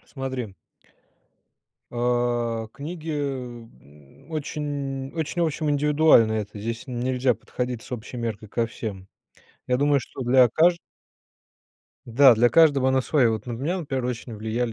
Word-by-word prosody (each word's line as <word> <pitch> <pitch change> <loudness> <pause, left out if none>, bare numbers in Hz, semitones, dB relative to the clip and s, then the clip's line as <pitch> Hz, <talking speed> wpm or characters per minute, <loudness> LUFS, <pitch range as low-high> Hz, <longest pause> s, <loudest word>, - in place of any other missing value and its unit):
Смотри 130 -6 -4 1.4
А, 120 -1 0
книги, 160 +3 -6
э, 130 -5 -4 0.2
м, 75 - -20
очень 140 -3 -4
очень, 160 +2 -2
в 165 - +3
общем, 150 0 -2
индивидуально 145 -5 +4
это. 105 -1 -4
Здесь 115 +4 -5
н 125 -2 -5
нельзя 125 0 +1
подходить 125 +2 -5
с - - -14
общей 120 +1 -6
меркой 110 -2 -4
ко 115 +2 0
всем. 100 -5 -7 0.6
Я 125 - +2
думаю, 145 0 +3
что 130 - -8
для 125 0 +5
кажд 170 +7 +3 1.3
да, 125 +1 +6
для 120 +2 +4
каждого 140 -1 +4
она 130 0 +2
своя. 130 -6 +3
Вот 110 +1 -4
на 120 - -4
меня, 150 +11 -2
например, 135 -6 -3
очень 120 -1 -4
влияли 110 +2 -2
125 Hz, 145 wpm, -24 LUFS, 115-145 Hz, 1.4 s, да